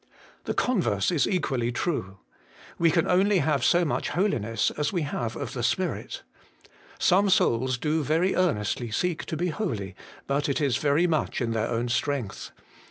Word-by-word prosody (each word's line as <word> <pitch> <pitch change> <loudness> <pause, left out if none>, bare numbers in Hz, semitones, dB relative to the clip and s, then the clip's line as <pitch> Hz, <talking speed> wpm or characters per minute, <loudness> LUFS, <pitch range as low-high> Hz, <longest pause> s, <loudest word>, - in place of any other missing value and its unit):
The - - -2
converse 120 - +1
is 165 -5 +2
equally 135 -10 0
true. 120 - -3 0.6
We 170 - +4
can 165 0 +2
only 195 +3 +3
have 150 -6 +1
so 175 0 +4
much 150 - -1
holiness 115 - 0
as 150 0 -2
we 175 -4 -1
have 120 -6 -3
of - - -5
the - - -4
Spirit. - - -2 0.7
Some 195 +3 +3
souls 130 -6 +2
do 155 +4 0
very 165 +6 +1
earnestly 120 - 0
seek 170 +9 -1
to 160 - -4
be 175 +3 0
holy, 115 - -3 0.3
but 140 +1 0
it 140 - 0
is 140 -5 +1
very 150 +4 +2
much 160 -3 0
in 120 -3 -1
their 110 0 0
own 120 +1 -1
strength. 120 -2 -2
145 Hz, 165 wpm, -26 LUFS, 120-175 Hz, 0.7 s, We